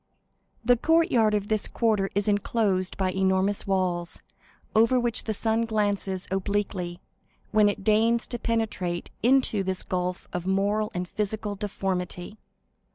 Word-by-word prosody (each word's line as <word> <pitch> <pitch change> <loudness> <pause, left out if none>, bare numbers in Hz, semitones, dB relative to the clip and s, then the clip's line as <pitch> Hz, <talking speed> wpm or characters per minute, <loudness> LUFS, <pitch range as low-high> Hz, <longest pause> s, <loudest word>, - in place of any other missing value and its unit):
The 245 +1 +5
courtyard 285 - +3
of 205 -1 -1
this 215 -1 0
quarter 215 -4 +1
is 205 0 0
enclosed 205 -2 +1
by 190 -1 0
enormous 190 +2 +1
walls, 180 -3 0 0.6
over 230 +3 +5
which 240 -1 0
the 220 - -1
sun 225 +2 +1
glances 205 -4 -1
obliquely, 190 -2 -2 0.5
when 210 -1 +5
it 200 - -4
deigns 225 +2 +3
to 240 - -5
penetrate 210 -7 -2
into 245 -3 +4
this 190 -1 -1
gulf 180 0 -3
of 180 0 -3
moral 205 +2 +1
and 180 0 -2
physical 210 +1 -3
deformity. 190 -1 -4
205 Hz, 135 wpm, -26 LUFS, 190-220 Hz, 0.6 s, The